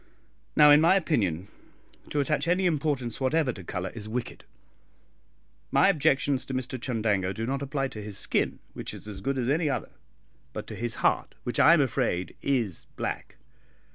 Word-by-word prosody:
Now, 150 Hz, -1 st, +8 dB
in 145 Hz, +1 st, +8 dB
my 170 Hz, +4 st, +5 dB
opinion, 100 Hz, -, 0 dB, 0.6 s
to 150 Hz, -, -1 dB
attach 145 Hz, +1 st, 0 dB
any 180 Hz, +2 st, +2 dB
importance 145 Hz, -8 st, 0 dB
whatever 135 Hz, 0 st, +2 dB
to 95 Hz, -, -10 dB
colour 90 Hz, +2 st, -4 dB
is 110 Hz, -2 st, -7 dB
wicked. 120 Hz, +1 st, -4 dB, 1.2 s
My -, -, +5 dB
objections 145 Hz, -5 st, +2 dB
to 130 Hz, -, -4 dB
Mr 130 Hz, 0 st, -3 dB
Chundango 105 Hz, -7 st, 0 dB
do 115 Hz, -, -3 dB
not 135 Hz, +3 st, -2 dB
apply 135 Hz, -1 st, -1 dB
to 110 Hz, -4 st, -8 dB
his 105 Hz, -2 st, -6 dB
skin, -, -, 0 dB, 0.2 s
which -, -, -6 dB
is -, -, -10 dB
as 100 Hz, -2 st, -6 dB
good 135 Hz, +6 st, -1 dB
as 125 Hz, -2 st, -1 dB
any 155 Hz, +3 st, +2 dB
other, 135 Hz, -, -3 dB, 0.6 s
but -, -, -5 dB
to -, -, -8 dB
his 120 Hz, 0 st, -2 dB
heart, -, -, +1 dB
which 120 Hz, -, -2 dB
I 165 Hz, -, +8 dB
am 155 Hz, -, +3 dB
afraid 120 Hz, -9 st, -1 dB
is 120 Hz, -, -1 dB
black. -, -, -4 dB
130 Hz, 175 wpm, -27 LUFS, 110-150 Hz, 1.2 s, Now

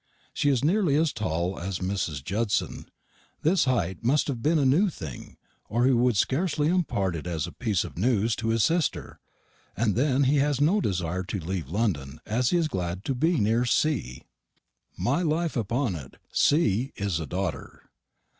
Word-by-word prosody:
She 145 Hz, -, +1 dB
is 135 Hz, -2 st, +1 dB
nearly 175 Hz, -3 st, +2 dB
as 155 Hz, 0 st, +2 dB
tall 90 Hz, -2 st, -2 dB
as 90 Hz, +1 st, -3 dB
Mrs. 90 Hz, -7 st, -3 dB
Judson. 105 Hz, +6 st, -2 dB, 0.5 s
This 165 Hz, +1 st, +3 dB
height 95 Hz, -9 st, -1 dB
must 135 Hz, +6 st, +2 dB
have 125 Hz, -4 st, -3 dB
been 160 Hz, +5 st, +2 dB
a 145 Hz, -, +2 dB
new 165 Hz, +10 st, +4 dB
thing, 75 Hz, -, -9 dB, 0.3 s
or 120 Hz, +4 st, +2 dB
he 135 Hz, -, +5 dB
would 120 Hz, -3 st, +3 dB
scarcely 150 Hz, -, +1 dB
impart 105 Hz, -, 0 dB
it 85 Hz, +2 st, -6 dB
as 80 Hz, -3 st, -2 dB
a 85 Hz, -, -8 dB
piece 110 Hz, -8 st, -1 dB
of -, -, -8 dB
news 115 Hz, 0 st, +2 dB
to 115 Hz, -, -3 dB
his 115 Hz, -1 st, +2 dB
sister. 165 Hz, -3 st, 0 dB, 0.6 s
And 110 Hz, -2 st, +2 dB
then 135 Hz, +1 st, +2 dB
he 140 Hz, +2 st, +3 dB
has 140 Hz, -1 st, +1 dB
no 175 Hz, +9 st, +3 dB
desire 90 Hz, -, -1 dB
to 100 Hz, -, -3 dB
leave 85 Hz, -4 st, -4 dB
London, 80 Hz, -8 st, -2 dB
as 120 Hz, +4 st, +1 dB
he 175 Hz, -, +2 dB
is 165 Hz, -2 st, +1 dB
glad 90 Hz, -, -3 dB
to 135 Hz, -, 0 dB
be 160 Hz, +7 st, +1 dB
near 115 Hz, +3 st, +2 dB
C. 120 Hz, -, 0 dB, 0.7 s
My 140 Hz, +8 st, +1 dB
life 165 Hz, 0 st, 0 dB
upon 120 Hz, 0 st, 0 dB
it, 70 Hz, -7 st, -9 dB
C. 135 Hz, -, +2 dB
is 100 Hz, -6 st, -1 dB
a 80 Hz, -, -5 dB
daughter. 95 Hz, +4 st, -4 dB
115 Hz, 180 wpm, -26 LUFS, 95-145 Hz, 0.7 s, he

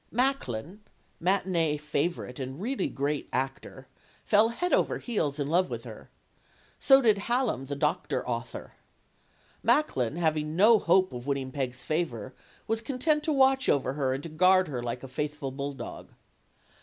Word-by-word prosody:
Macklin, 210 Hz, -, -1 dB, 0.4 s
matinee 175 Hz, -4 st, +1 dB
favorite 150 Hz, -2 st, -3 dB
and 130 Hz, +2 st, -5 dB
really 255 Hz, +7 st, -1 dB
great 145 Hz, +1 st, -2 dB
actor, 135 Hz, 0 st, -4 dB, 0.4 s
fell 215 Hz, +1 st, +4 dB
heels 355 Hz, +10 st, -2 dB
over -, -, +2 dB
head 155 Hz, -, -2 dB
in 140 Hz, -, -1 dB
love 180 Hz, +4 st, +2 dB
with -, -, -5 dB
her. -, -, -11 dB, 0.7 s
So 270 Hz, -1 st, +6 dB
did 215 Hz, -3 st, +4 dB
Hallam, 230 Hz, -, -1 dB
the 140 Hz, -, -3 dB
doctor 150 Hz, -2 st, -1 dB
author. 120 Hz, -1 st, -5 dB, 0.9 s
Macklin, 135 Hz, -, +1 dB
having 155 Hz, -2 st, 0 dB
no 215 Hz, +4 st, +6 dB
hope 185 Hz, 0 st, +3 dB
of 125 Hz, +2 st, -7 dB
win 140 Hz, -, +1 dB
ning 130 Hz, -1 st, -5 dB
Peg's 130 Hz, -2 st, -4 dB
favor, 130 Hz, -7 st, -2 dB, 0.3 s
was 225 Hz, 0 st, -1 dB
content 285 Hz, +5 st, 0 dB
to 320 Hz, -, +1 dB
watch 265 Hz, -1 st, +3 dB
over 135 Hz, -2 st, +1 dB
her 135 Hz, -2 st, 0 dB
and 135 Hz, -, -6 dB
to 165 Hz, -, -6 dB
guard 185 Hz, +3 st, +4 dB
her 125 Hz, -4 st, -3 dB
like 120 Hz, +1 st, -4 dB
a -, -, -6 dB
faithful 150 Hz, +1 st, -4 dB
bulldog. 140 Hz, -2 st, -6 dB
155 Hz, 155 wpm, -28 LUFS, 135-210 Hz, 0.9 s, So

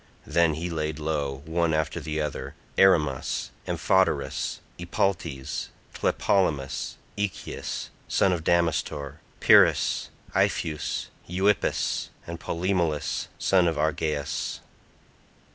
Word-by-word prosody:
Then 80 Hz, 0 st, +3 dB
he 85 Hz, +3 st, -3 dB
laid 80 Hz, -1 st, -2 dB
low, 75 Hz, -3 st, -2 dB
one 80 Hz, 0 st, +1 dB
after 80 Hz, -1 st, -1 dB
the 75 Hz, 0 st, -3 dB
other, 75 Hz, -1 st, -3 dB, 0.2 s
Erymas, 75 Hz, -8 st, +3 dB, 0.2 s
Amphoterus, 85 Hz, -7 st, +1 dB, 0.2 s
Epaltes, 85 Hz, -6 st, -1 dB, 0.3 s
Tlepolemus, 70 Hz, -8 st, 0 dB, 0.2 s
Echius 105 Hz, -2 st, -3 dB, 0.2 s
son 95 Hz, -, +3 dB
of 85 Hz, -2 st, -2 dB
Damastor, 80 Hz, -5 st, 0 dB, 0.2 s
Pyris, -, -, +5 dB, 0.2 s
Ipheus, 75 Hz, -2 st, 0 dB, 0.2 s
Euippus 95 Hz, +3 st, +1 dB, 0.2 s
and 85 Hz, 0 st, -6 dB
Polymelus 85 Hz, -4 st, -1 dB
son 90 Hz, -2 st, +3 dB
of 80 Hz, -, +1 dB
Argeas. 75 Hz, -2 st, -1 dB
80 Hz, 95 wpm, -26 LUFS, 75-85 Hz, 0.3 s, Pyris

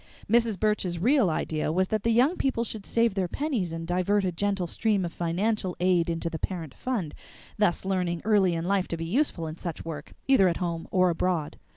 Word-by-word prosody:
Mrs. 230 Hz, -2 st, +2 dB
Burch's 210 Hz, -5 st, 0 dB
real 235 Hz, -, +3 dB
idea 155 Hz, -1 st, -1 dB
was 185 Hz, +3 st, +1 dB
that 215 Hz, -1 st, 0 dB
the 230 Hz, -, 0 dB
young 250 Hz, +9 st, +4 dB
people 265 Hz, -7 st, 0 dB
should 220 Hz, -3 st, -6 dB
save 230 Hz, -2 st, +2 dB
their 190 Hz, -2 st, 0 dB
pennies 245 Hz, -, -2 dB
and 165 Hz, 0 st, -5 dB
divert 185 Hz, +3 st, +1 dB
a 185 Hz, -, 0 dB
gentle 195 Hz, +1 st, -1 dB
stream 200 Hz, +2 st, 0 dB
of 170 Hz, -, -5 dB
financial 185 Hz, +3 st, -1 dB
aid 180 Hz, -2 st, +2 dB
into 165 Hz, 0 st, -2 dB
the 165 Hz, -1 st, -4 dB
parent 165 Hz, -7 st, -4 dB
fund, 220 Hz, -12 st, -3 dB, 0.5 s
thus 200 Hz, -3 st, +2 dB
learning 180 Hz, -3 st, -1 dB
early 200 Hz, -5 st, +3 dB
in 165 Hz, 0 st, -3 dB
life 195 Hz, 0 st, +1 dB
to 170 Hz, -, -3 dB
be 165 Hz, -, -4 dB
useful 190 Hz, -, 0 dB
in 155 Hz, +1 st, -6 dB
such 170 Hz, -3 st, -5 dB
work, 155 Hz, -2 st, -7 dB
either 265 Hz, -9 st, +5 dB
at 170 Hz, -, 0 dB
home 170 Hz, -2 st, -3 dB
or 185 Hz, -1 st, +3 dB
abroad. 170 Hz, -2 st, -1 dB
185 Hz, 210 wpm, -27 LUFS, 170-215 Hz, 0.5 s, either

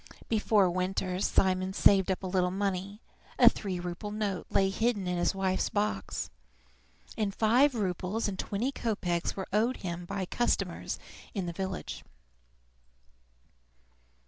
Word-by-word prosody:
Before 210 Hz, -3 st, +4 dB
winter 185 Hz, 0 st, -1 dB
Simon 185 Hz, -1 st, +2 dB
saved 195 Hz, -1 st, +5 dB
up 190 Hz, 0 st, -1 dB
a -, -, -2 dB
little 180 Hz, -1 st, +1 dB
money: 195 Hz, +2 st, -2 dB, 0.4 s
a -, -, +7 dB
three 190 Hz, -4 st, +3 dB
rouble 175 Hz, +4 st, -5 dB
note 205 Hz, -4 st, -2 dB
lay 195 Hz, -1 st, +3 dB
hidden 220 Hz, -1 st, 0 dB
in 180 Hz, -1 st, -1 dB
his 175 Hz, -, +1 dB
wife's 190 Hz, -1 st, 0 dB
box, 205 Hz, -, -2 dB, 0.8 s
and 205 Hz, -2 st, -1 dB
five 250 Hz, +5 st, +4 dB
roubles 195 Hz, +1 st, -1 dB
and 190 Hz, -2 st, -4 dB
twenty 225 Hz, +7 st, -1 dB
kopeks 185 Hz, -9 st, -1 dB
were 190 Hz, -, -4 dB
owed 230 Hz, +5 st, +2 dB
him 175 Hz, 0 st, -4 dB
by 195 Hz, +1 st, -3 dB
customers 240 Hz, +6 st, -1 dB, 0.4 s
in 195 Hz, -3 st, -1 dB
the 170 Hz, -, -4 dB
village. 190 Hz, +1 st, -4 dB
195 Hz, 135 wpm, -30 LUFS, 185-210 Hz, 0.8 s, a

